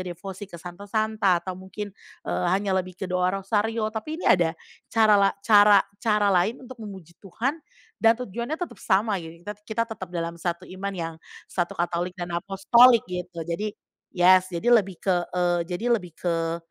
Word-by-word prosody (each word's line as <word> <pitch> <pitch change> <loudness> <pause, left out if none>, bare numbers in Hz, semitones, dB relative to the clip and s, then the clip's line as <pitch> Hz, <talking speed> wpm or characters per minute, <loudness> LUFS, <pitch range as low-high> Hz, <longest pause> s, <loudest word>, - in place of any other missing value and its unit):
devosi 185 +2 -7
ke 170 - -10
santo-santa, 200 +2 0
atau 185 - -3
mungkin, 190 +2 -8 0.3
eee, - - -1
hanya 195 +2 +1
lebih 185 0 -10
ke 190 - -5
doa 180 0 +1
rosario, 215 +3 -1
tapi 270 +8 -4
ini 345 - -8
ada 165 -3 +3 0.3
cara 220 -2 +4
la 195 - +5 0.2
cara 205 -2 +7 0.2
cara 210 -2 +2
lain 190 +7 +2
untuk 250 -2 -11
memuji 190 -6 -10
Tuhan 245 - -3 0.4
dan 225 0 +5
tujuannya 240 +5 -4
tetap 355 - -6
sama 200 0 +1
gitu, 165 +1 -11
kita 210 - -4 0.2
kita 225 +1 0
tetap 190 -4 -7
dalam 170 -1 -4
satu 175 +1 -3
iman 190 +2 -5
yang 165 -2 -4 0.3
satu 175 -2 -3
katolik 175 +1 -2
dan 175 -1 -5
apostolik 200 +7 +5
gitu. 180 -2 -6
Jadi 200 +6 -3 0.4
yes, 185 +1 +6
jadi 185 +7 +1
lebih 200 -6 +3
ke, 185 -2 +2 0.2
eee, 175 -1 +2
jadi 225 +7 0
lebih 175 -3 -13
ke, 165 -1 -1
190 Hz, 170 wpm, -25 LUFS, 175-215 Hz, 0.4 s, cara